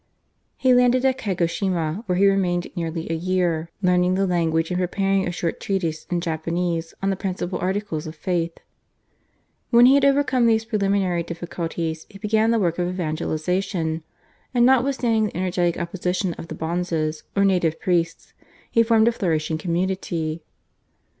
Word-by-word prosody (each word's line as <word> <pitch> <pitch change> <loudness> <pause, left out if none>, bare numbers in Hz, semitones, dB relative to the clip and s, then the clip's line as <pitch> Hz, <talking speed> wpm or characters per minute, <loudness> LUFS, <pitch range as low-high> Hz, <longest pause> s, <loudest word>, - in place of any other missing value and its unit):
He 260 -1 +4
landed 250 +1 +4
at 265 0 +2
Kagoshima, 175 -2 -1
where 180 -1 +1
he 200 - +4
remained 185 -3 +1
nearly 165 -1 -3
a - - 0
year 170 -2 0
learning 180 0 +3
the 195 +1 +2
language 165 -2 0
and 180 - 0
preparing 195 +1 +1
a - - -1
short 170 -1 -3
treatise 170 -5 -2
in 175 -1 0
Japanese 165 0 -2
on 195 - +2
the - - 0
principal 185 -1 -3
articles 185 -4 -2
of 155 - -7
faith. 170 0 -1 1.2
When 240 0 +7
he 260 - +7
had 280 0 +4
overcome 275 -3 +3
these 225 -1 +2
preliminary 200 -5 +1
difficulties 165 -1 -4
he 200 - -12
began 215 +2 +1
the 230 - +3
work 175 -5 0
of 175 - +1
evangelisation, 165 0 -2 0.5
and 240 0 +5
notwithstanding 250 -4 +3
the 190 - -7
energetic 180 -2 0
opposition 180 +1 -2
of 165 - -9
the - - -6
bonzes 160 -2 -2
or 200 0 +3
native 175 -4 +1
priests 170 -2 -1 0.4
he 230 - +4
formed 225 -1 +4
a - - +5
flourishing 160 -7 -1
community. 170 -2 -2
180 Hz, 155 wpm, -23 LUFS, 165-200 Hz, 1.2 s, When